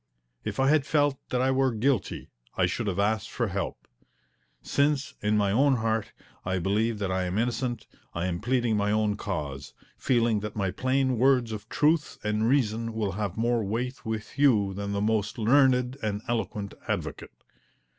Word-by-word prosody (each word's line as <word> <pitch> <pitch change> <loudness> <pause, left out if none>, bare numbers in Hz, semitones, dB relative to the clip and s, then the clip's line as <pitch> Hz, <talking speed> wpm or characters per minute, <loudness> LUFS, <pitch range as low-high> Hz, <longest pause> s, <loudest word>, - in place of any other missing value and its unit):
If - - -4
I 135 - +4
had 155 -1 +4
felt 145 -3 +2
that 125 - 0
I 130 +1 +2
were 130 0 +2
guilty 120 +1 -1 0.3
I 90 - +4
should 105 +5 -2
have 95 -2 -1
asked 105 +1 0
for - - -2
help. - - -4 0.8
Since, 140 -1 +1
in 105 +1 +2
my 100 -1 +2
own 135 +5 +4
heart, 110 -2 -1 0.3
I 90 +1 -1
believe 105 +5 0
that 100 -2 -2
I 95 0 0
am 90 +2 -2
innocent, 120 0 -1 0.3
I 85 +1 -1
am 85 -2 -2
pleading 120 -1 +1
my 105 0 +1
own 105 -1 +1
cause, 70 -10 -5 0.2
feeling 115 -4 +2
that 105 0 -6
my 100 -3 0
plain 130 +1 0
words 125 -3 +3
of 110 0 -7
truth 150 0 +1
and 105 +2 +1
reason 115 -4 +1
will 105 -3 -1
have 100 -1 -3
more 115 0 +1
weight 120 +6 -3
with 110 +4 -5
you 105 -9 +4
than 100 +1 -4
the 100 0 -1
most 105 -1 0
learned 125 +2 +3
and 105 -1 -2
eloquent 110 -4 -2
advocate. - - -4
110 Hz, 175 wpm, -27 LUFS, 100-130 Hz, 0.8 s, I